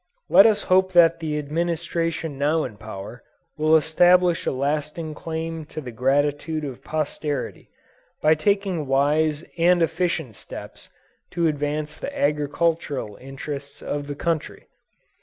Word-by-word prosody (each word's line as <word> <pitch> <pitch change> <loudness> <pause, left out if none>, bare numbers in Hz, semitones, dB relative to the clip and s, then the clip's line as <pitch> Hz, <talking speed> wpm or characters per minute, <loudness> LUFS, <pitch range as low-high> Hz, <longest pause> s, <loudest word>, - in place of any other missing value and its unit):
Let 195 +5 +9
us 215 -2 +2
hope 190 0 +3
that 165 -1 +6
the 155 -2 -2
Administration 165 0 -2
now 155 +3 +2
in 105 - -6
power, 110 +2 -8 0.3
will 155 +1 +4
establish 175 +3 +4
a - - +2
lasting 150 +4 -2
claim 165 0 -4
to 155 - -7
the 130 -5 -7
gratitude 145 +5 0
of 135 -4 -6
posterity, 150 -1 -3 0.5
by 155 - +5
taking 190 -2 0
wise 150 +3 +2 0.2
and 175 +1 +4
efficient 165 - -1
steps - - -10 0.4
to 170 -1 +1
advance 150 0 -2
the 285 0 -5
agricultural 145 -5 0
interests 140 +1 -8
of 145 0 -3
the 145 - -4
country. 165 +1 -3
155 Hz, 130 wpm, -23 LUFS, 145-170 Hz, 0.5 s, Let